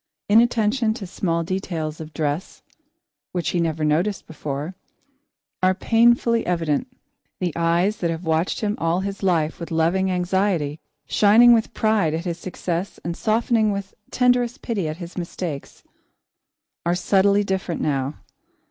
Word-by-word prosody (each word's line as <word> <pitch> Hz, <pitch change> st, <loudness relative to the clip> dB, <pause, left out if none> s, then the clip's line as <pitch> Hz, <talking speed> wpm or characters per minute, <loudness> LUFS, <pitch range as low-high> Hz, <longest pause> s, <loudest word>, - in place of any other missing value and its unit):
Inattention 225 Hz, +1 st, +3 dB
to 210 Hz, -, -6 dB
small 170 Hz, -2 st, -1 dB
details 165 Hz, -4 st, -3 dB
of 155 Hz, 0 st, -8 dB
dress, 155 Hz, +2 st, -3 dB, 0.7 s
which 175 Hz, -2 st, -1 dB
he 175 Hz, -, 0 dB
never 160 Hz, -2 st, 0 dB
noticed 175 Hz, +7 st, 0 dB
before, 150 Hz, +1 st, -5 dB, 0.9 s
are 185 Hz, 0 st, +3 dB
painfully 230 Hz, +1 st, +3 dB
evident. 165 Hz, -, 0 dB, 0.5 s
The 180 Hz, -3 st, -1 dB
eyes 170 Hz, +5 st, +1 dB
that 170 Hz, -, -1 dB
have 165 Hz, +1 st, -3 dB
watched 160 Hz, +1 st, 0 dB
him 210 Hz, -1 st, 0 dB
all 165 Hz, +2 st, +1 dB
his 195 Hz, 0 st, -5 dB
life 165 Hz, -5 st, +1 dB
with 170 Hz, -, -6 dB
loving 170 Hz, +4 st, +1 dB
anxiety, 180 Hz, -4 st, 0 dB, 0.3 s
shining 230 Hz, +4 st, +6 dB
with 225 Hz, -1 st, +1 dB
pride 210 Hz, -8 st, +2 dB
at 165 Hz, +3 st, -4 dB
his 170 Hz, -1 st, -3 dB
success 180 Hz, 0 st, -4 dB
and 170 Hz, 0 st, -3 dB
softening 220 Hz, 0 st, +2 dB
with 200 Hz, -1 st, -5 dB, 0.2 s
tenderest 245 Hz, -1 st, +1 dB
pity 205 Hz, -9 st, -1 dB
at 155 Hz, +1 st, -4 dB
his 175 Hz, +1 st, -7 dB
mistakes, 170 Hz, -4 st, -6 dB, 1.0 s
are 170 Hz, +1 st, +1 dB
subtly 200 Hz, +2 st, +3 dB
different 190 Hz, -3 st, -2 dB
now. 140 Hz, 0 st, -1 dB
180 Hz, 140 wpm, -22 LUFS, 165-205 Hz, 1.0 s, shining